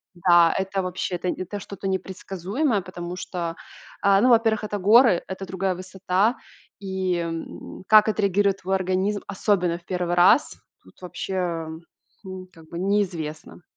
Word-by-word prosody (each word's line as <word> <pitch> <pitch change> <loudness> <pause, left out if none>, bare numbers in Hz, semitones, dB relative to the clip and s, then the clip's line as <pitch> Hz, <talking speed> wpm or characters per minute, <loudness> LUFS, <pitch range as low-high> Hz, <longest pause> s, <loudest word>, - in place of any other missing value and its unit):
Да, 175 -1 +5
это 190 0 -1
вообще, 185 0 -3
это 180 +1 -3
это 185 +3 -4
что-то 200 -1 -7
непредсказуемое, 190 - -2
потому 175 -1 -7
что, 170 -2 -4 0.5
а, 200 0 +4
ну, 255 - +4
во-первых, 225 -2 +3
это 205 -1 -3
горы, 210 0 +5
это 190 +1 -6
другая 190 +1 -1
высота. 185 +5 0 0.4
И, 190 -2 -2
м, 165 +2 -6
как 215 0 +7
отреагирует 200 -1 +1
твой 190 +2 0
организм, 190 +2 0
особенно 180 -4 0
в 170 - -30
1 180 -2 -2
раз, 190 +10 +4 0.3
тут - - -21
вообще, 175 -2 -3 0.6
хм, 185 -1 -8
как 160 -2 -17
бы 170 - -7
неизвестно. 175 -4 -2
185 Hz, 145 wpm, -24 LUFS, 175-200 Hz, 0.6 s, как